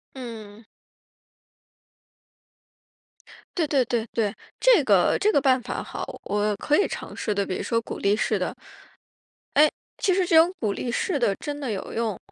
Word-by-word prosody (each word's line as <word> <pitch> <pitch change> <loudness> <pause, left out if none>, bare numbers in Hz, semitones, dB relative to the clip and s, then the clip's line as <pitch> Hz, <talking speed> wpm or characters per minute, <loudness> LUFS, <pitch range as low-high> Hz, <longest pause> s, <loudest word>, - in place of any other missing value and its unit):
嗯。 225 -4 -9 2.9
对 335 -4 +1
对 280 -3 +2
对 230 -1 -1
对， 210 -3 0 0.2
这 - - +5
个 200 -6 +4
这 420 +2 +3
个 285 - +4
办 260 -1 +3
法 - - -4
好。 - - -7
我 210 0 0
可 295 +8 +1
以 405 - +3
尝 - - -7
试 210 - -2
的， 200 0 0
比 185 - -3
如 - - -3
说 230 -1 0
鼓 - - -7
励 200 +1 +2
式 - - 0
的。 - - -2 1.0
哎， 300 +2 +7 0.3
其 375 - +2
实 375 0 +2
这 335 - +3
种 330 +3 +6
鼓 215 -4 0
励 240 - -3
式 290 +6 -1
的 230 -6 +2
真 290 0 -5
的 270 -5 -4
有 200 -3 -5
用。 225 -5 -2
235 Hz, 185 characters per minute, -25 LUFS, 210-295 Hz, 2.9 s, 哎